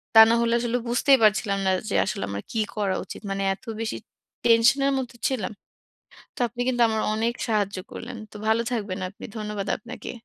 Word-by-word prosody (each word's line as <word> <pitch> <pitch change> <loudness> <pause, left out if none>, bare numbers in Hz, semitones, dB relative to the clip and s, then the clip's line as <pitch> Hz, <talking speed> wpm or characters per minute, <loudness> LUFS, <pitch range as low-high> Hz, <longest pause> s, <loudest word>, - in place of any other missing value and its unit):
তা 220 - +12
না 230 - +4
হলে 235 0 +2
আসলে 240 +1 0
বুঝতেই 265 +3 +5
পারছিলাম 210 -1 +3
না - - +4 0.2
যে - - -1
আসলে 145 - -3
আমার 100 0 -4
কি 225 - -1 0.2
করা 200 -3 0
উচিত! - - -9
মানে 195 0 -2
এত 195 - -24 0.2
বেশি 225 - -2 0.5
টেনশন 230 +4 +5
এর 275 - +2
মধ্যে 250 -2 -4
ছিলাম! 235 -9 -2 0.8
তো - - -11
আপনি 240 +2 -6
কিন্তু 245 -1 +1
আমার 220 0 0
অনেক 225 +2 0
সাহায্য 205 -3 0
করলেন। - - -7
তো - - -17
ভালো 220 +1 +3
থাকবেন 205 -5 -2
আপনি। 200 - -11
ধন্যবাদ 210 -2 -4
আপনাকে। 240 +3 -8
225 Hz, 195 wpm, -25 LUFS, 205-240 Hz, 0.8 s, তা